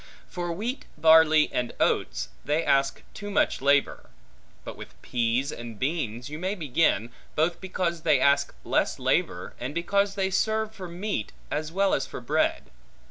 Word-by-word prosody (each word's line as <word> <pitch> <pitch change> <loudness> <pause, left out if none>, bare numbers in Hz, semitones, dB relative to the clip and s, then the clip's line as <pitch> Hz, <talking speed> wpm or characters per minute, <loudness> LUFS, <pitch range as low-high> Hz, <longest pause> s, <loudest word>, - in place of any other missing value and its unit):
For 175 -1 -4
wheat, 230 +10 -4
barley, 160 -1 +6
and 125 -1 -1
oats, 60 0 0
they 150 +3 0
ask 135 0 +2
too 205 -1 -7
much 200 - +1
labor; 140 - +2 0.6
but - - -7
with - - -12
pease 120 +3 0
and 115 -2 -8
beans 125 -4 -2
you 150 +2 -7
may 190 +3 -1
begin, 140 - +1 0.2
both 165 +3 +1
because 180 -3 -2
they 155 -4 +3
ask 140 +1 +3
less - - +1
labor, - - 0
and 130 +5 -5
because 200 +3 +1
they 190 -1 0
serve 220 +3 0
for 190 -4 -8
meat, 175 - -3 0.2
as 155 +1 -2
well 195 +2 +2
as 135 - 0
for - - -7
bread. - - 0
160 Hz, 160 wpm, -26 LUFS, 135-190 Hz, 0.6 s, barley